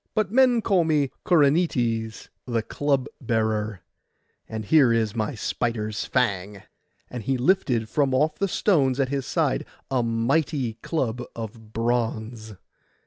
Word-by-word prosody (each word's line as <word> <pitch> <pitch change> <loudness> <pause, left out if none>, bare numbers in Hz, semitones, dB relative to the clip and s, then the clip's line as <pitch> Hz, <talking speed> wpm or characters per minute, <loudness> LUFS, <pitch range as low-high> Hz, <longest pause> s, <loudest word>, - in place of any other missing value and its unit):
But 215 -4 +1
men 245 -2 +4
call 185 -3 +3
me 150 -4 +1 0.2
Corynetes 140 - +1 0.2
the 115 -2 0
club 140 +1 0 0.2
bearer; 110 -4 -1 0.7
and 110 -1 -5
here 140 -2 +5
is 115 -2 +1
my 110 +1 -2
spider's 110 -1 -2
fang.' 100 -5 -1 0.5
And 125 - -5
he 130 +5 -1
lifted 125 - +1
from 140 +2 +1
off 155 +3 +1
the 200 - +1
stones 145 -9 +2
at 135 -2 +1
his 135 -2 -2
side 155 -2 0 0.3
a 130 -2 +2
mighty 120 +2 0
club 125 -7 -2
of 110 -1 -8
bronze. 115 -1 -2
125 Hz, 135 wpm, -25 LUFS, 110-145 Hz, 0.7 s, here